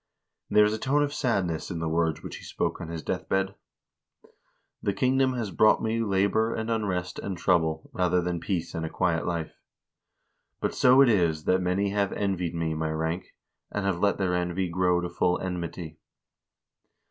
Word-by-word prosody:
There 105 0 +6
is 105 - +1
a 110 - -3
tone 145 +4 +2
of 145 0 -2
sadness 95 - -1
in 90 - -4
the 80 0 -2
words 80 0 0
which - - -6
he - - -13
spoke - - -2
on 85 - -5
his 80 -1 -6
death - - -3
bed: 95 0 +1 0.6
" - - -32
The 100 - -1
king 130 +5 +2
dom 130 -1 +3
has 115 -5 -3
brought 110 +5 +4
me 115 +1 0
labor 100 +2 +1
and 110 +1 -3
unrest 95 -5 -2
and 95 -3 -4
trouble, 80 -4 +1
rather 90 0 +2
than 90 -1 -2
peace 85 -1 -3
and 80 - -3
a 80 - -3
quiet 85 -2 0
life. 85 -3 -3 1.1
But - - -1
so 130 +2 +6
it 135 - +6
is, 85 -7 +2
that 95 +3 +2
many 95 +2 0
have 100 -1 0
envied 90 -4 -1
me 80 -1 -1
my 80 0 -2
rank, 80 +3 -3 0.4
and 105 -1 -2
have 95 -3 0
let 100 +1 +2
their 95 -2 0
envy 90 +1 -1
grow 90 0 +2
to 90 - -2
full 90 +1 +1
enmity. 85 -3 -5
90 Hz, 195 wpm, -27 LUFS, 85-100 Hz, 1.1 s, There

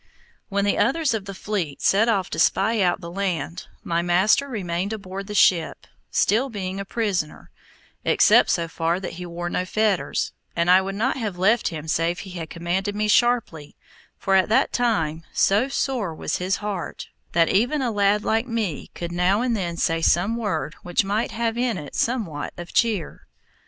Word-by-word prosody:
When 200 0 0
the 205 - +1
others 310 -2 +2
of 215 -3 -3
the 195 - -6
fleet 190 -8 -3
set 220 +4 +3
off 195 -5 +1
to - - -3
spy 220 +3 +2
out 180 +1 +1
the 170 -1 -7
land, 175 -4 -3 0.2
my 170 0 0
master 185 +10 +3
remained 195 -4 -3
aboard 195 -2 -6
the 210 - -6
ship, 175 -4 +3 0.2
still 235 +7 +2
being 195 -4 -4
a 195 - -4
prisoner, 195 -8 -2 0.5
except - - +5
so 170 -1 +1
far 165 +2 -1
that 190 - -5
he 180 +1 -7
wore 175 0 -5
no 175 - -1
fetters, 190 -6 0 0.2
and 170 +1 +3
I 185 +1 +7
would 195 +1 -4
not 245 +7 0
have 210 -7 -3
left 210 +6 +3
him 160 -2 -5
save 165 +2 0
he 190 - -9
had 170 -3 -6
commanded 180 +4 -2
me 210 0 0
sharply, 210 -10 +1 0.4
for 195 - -1
at 190 +1 +4
that 220 - +2
time, 165 -10 0
so 205 +7 +3
sore 250 -10 -2
was - - -2
his 185 +2 0
heart, 205 -4 -5 0.2
that 165 -1 +4
even 245 +8 +2
a 240 - 0
lad 205 0 +2
like 225 +3 0
me 220 - -3
could 170 0 -5
now 180 +5 +2
and 245 -2 +1
then 175 -5 -3
say 165 -1 0
some 175 +7 +2
word 195 -9 -2
which 175 +2 0
might 205 +3 0
have 230 0 -2
in 245 -4 0
it 150 -4 -8
somewhat 200 - -2
of 175 -1 -8
cheer. 215 -9 0
195 Hz, 190 wpm, -23 LUFS, 175-220 Hz, 0.5 s, I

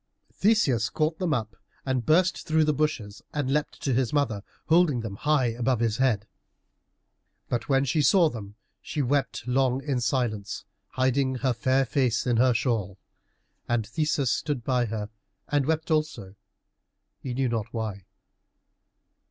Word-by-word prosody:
Theseus 140 - +2
caught 155 +3 -1
them 180 -4 0
up 110 -8 -2 0.3
and 130 -2 0
burst 180 +7 +2
through 160 0 +3
the 150 0 +2
bushes 125 -9 -2
and 140 -2 0
leapt 150 0 -2
to 135 - +1
his 125 -1 +1
mother, 135 -9 0 0.2
holding 160 -6 +3
them 110 -3 -5
high 145 +1 +2
above 120 +1 0
his 115 -2 0
head. 120 -6 +1 1.2
But 120 - -2
when 135 0 +3
she 140 +4 +1
saw 175 +3 +5
them 105 -7 -7 0.3
she 150 - -2
wept 135 -2 -1
long 130 +1 +1
in 135 -3 -1
silence, 110 -4 -2 0.2
hiding 130 +1 +1
her 130 - +3
fair 130 +3 +2
face 125 -5 +1
in 120 -2 +2
her 125 0 +4
shawl. 110 -6 -1 0.7
And 120 -2 +1
Theseus 140 +2 0
stood 145 -6 -2
by 125 0 +1
her 105 -2 -4 0.4
and 145 -2 +1
wept 160 +1 -1
also, 150 -11 -1 0.9
he 125 -3 -5
knew 135 0 +1
not 115 -1 -2
why. 110 -5 -4
130 Hz, 150 wpm, -26 LUFS, 115-145 Hz, 1.2 s, saw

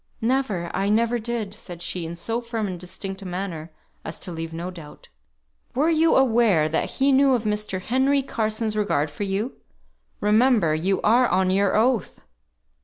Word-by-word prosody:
"Never. 225 -8 -1
I 195 +1 0
never 230 +3 +2
did," 225 -3 -3
said 175 -5 -10
she, 170 -1 -3
in 170 - -6
so 225 +7 -2
firm 230 -2 -3
and 185 -3 -5
distinct 190 +2 -6
a - - -9
manner 175 -3 -5 0.3
as 160 - -6
to 180 - -5
leave 165 -1 -5
no 170 +3 -5
doubt. 165 -5 -12 0.7
"Were 300 +6 +2
you 320 0 +3
aware 225 -11 +4
that 155 - -1
he 275 +1 +2
knew 270 0 +5
of 235 - -2
Mr. 210 -3 -1
Henry 265 +7 +1
Carson's 220 -3 -1
regard 160 -8 0
for 200 +8 -4
you? 200 +6 -3 0.6
Remember 210 -5 +3
you 185 +5 0
are 240 +3 +4
on 185 +1 +2
your 195 +1 +2
oath!" 230 -2 +1
210 Hz, 175 wpm, -24 LUFS, 180-235 Hz, 0.7 s, knew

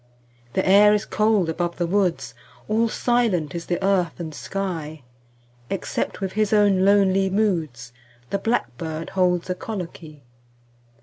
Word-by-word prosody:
The 190 - 0
air 205 +2 +6
is 210 - -2
cold 215 -4 +2
above 170 +1 -2
the 175 - 0
woods; 185 -1 0 0.3
5 - - -12
All 225 +1 +2
silent 220 - 0
is 170 -1 -6
the 175 - 0
earth 185 -4 +1
and 160 -2 -6
sky, 160 -5 -5 0.7
Except 195 - -3
with 190 -1 -2
his 215 0 0
own 205 -3 +4
lonely 195 -1 +3
moods 165 - -1 0.4
The 200 - 0
blackbird 160 - -3
holds 180 -2 +1
a 180 - -1
colloquy. 170 -7 -8
185 Hz, 140 wpm, -23 LUFS, 165-205 Hz, 0.7 s, air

